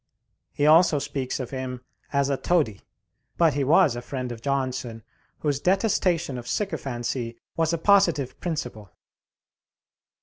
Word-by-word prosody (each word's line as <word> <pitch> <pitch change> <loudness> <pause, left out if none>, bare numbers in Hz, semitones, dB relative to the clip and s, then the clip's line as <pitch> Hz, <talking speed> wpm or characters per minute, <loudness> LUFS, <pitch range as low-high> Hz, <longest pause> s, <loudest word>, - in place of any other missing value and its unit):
He 145 - 0
also 160 0 +6
speaks 140 -2 -3
of 130 - -5
him 130 -2 -5 0.3
as 140 0 +1
a - - +2
toady; 135 - 0 0.6
but 165 -3 +4
he 140 +1 0
was 150 -1 +4
a 120 - -5
friend 125 0 -5
of 115 -1 -8
Johnson, 130 -4 -2 0.4
whose 145 -3 0
detestation 180 - +1
of 120 - -10
sycophancy 125 - -3 0.2
was 165 -1 +1
a 170 - 0
positive 170 -7 +3
principle. 150 - -4
140 Hz, 135 wpm, -25 LUFS, 125-165 Hz, 0.6 s, also